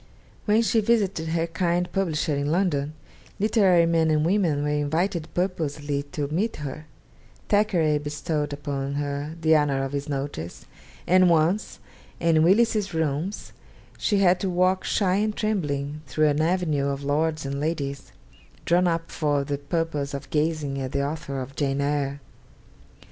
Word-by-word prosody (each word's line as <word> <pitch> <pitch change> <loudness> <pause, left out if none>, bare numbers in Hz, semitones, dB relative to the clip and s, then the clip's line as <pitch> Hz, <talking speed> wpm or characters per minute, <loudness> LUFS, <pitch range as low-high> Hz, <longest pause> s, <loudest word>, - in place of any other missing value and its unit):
When 215 +2 +3
she 225 0 +2
visited 200 -7 +1
her 165 +1 0
kind 170 +1 0
publisher 160 -5 0
in 140 +1 -1
London, 155 -5 0 0.5
literary 195 -5 +4
men 165 -1 +2
and 155 0 +2
women 170 -6 +1
were 150 - 0
invited 160 +4 -1
purposely 150 -6 -1
to 145 - -2
meet 195 +9 -1
her: 150 +1 -7 0.6
Thackeray 175 -8 +2
bestowed 150 0 -3
upon 140 -1 -3
her 145 +2 -3
the 160 0 +4
honour 140 -3 +2
of 135 - -3
his 145 0 -4
notice; 135 - -5 0.4
and 185 0 +5
once 170 +5 +1 0.4
in 165 -2 +3
Willis's 205 +1 +3
Rooms, 160 +5 -2 0.5
she 205 - +1
had 185 -2 +4
to 190 - -1
walk 185 +1 +2
shy 190 -2 +1
and 215 +1 0
trembling 150 -8 -2
through 155 +3 +2
an 145 +1 +1
avenue 160 -4 +1
of 140 0 -3
lords 155 +2 0
and 140 0 -3
ladies, 140 -3 -3 0.5
drawn 180 +1 +3
up 165 -1 -1
for 145 -3 0
the 140 0 -3
purpose 145 -1 -2
of 140 - -8
gazing 150 -3 0
at 130 +1 -4
the 140 0 0
author 145 -2 -4
of 130 +1 -7
'Jane 140 -1 0
Eyre.' 140 -1 -1
155 Hz, 155 wpm, -25 LUFS, 145-180 Hz, 0.6 s, and